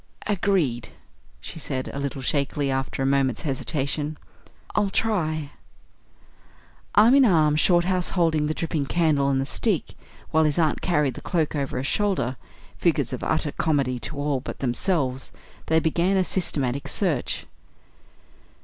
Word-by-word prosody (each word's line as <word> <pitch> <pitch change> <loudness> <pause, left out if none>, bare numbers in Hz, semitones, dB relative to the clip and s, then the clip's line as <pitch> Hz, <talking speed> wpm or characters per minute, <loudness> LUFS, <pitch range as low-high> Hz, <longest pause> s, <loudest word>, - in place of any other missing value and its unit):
"Agreed," 180 - 0 0.5
she 165 - -9
said, 130 -4 -3
a 140 - -4
little 140 -1 -4
shakily, 140 0 0
after 135 0 -2
a - - +1
moment's 135 -3 +1
hesitation. 145 +1 -2 0.6
"I'll 205 -2 +1
try 155 -9 -1 0.7
" - - -26
Arm 220 +4 +7
in 275 0 +7
arm, 155 - +4
Shorthouse 175 +2 +2
holding 160 -4 +1
the 155 - -2
dripping 160 -4 -2
candle 155 -5 +2
and 135 -1 +1
the 135 - -1
stick, 190 +5 0 0.4
while 160 0 +4
his 150 -1 +1
aunt 160 -3 +1
carried 150 -7 +1
the - - -9
cloak 160 -4 -1
over 140 -3 -2
her 130 - -2
shoulders, 185 - 0 0.5
figures - - +1
of - - -5
utter - - 0
comedy 135 -5 0
to 145 - -5
all 145 -2 0
but 125 - -7
themselves, 135 0 -1 0.4
they 160 0 +4
began 170 +4 +1
a 190 - +3
systematic 140 -8 0
search. 165 - -1
150 Hz, 150 wpm, -24 LUFS, 135-175 Hz, 0.7 s, Arm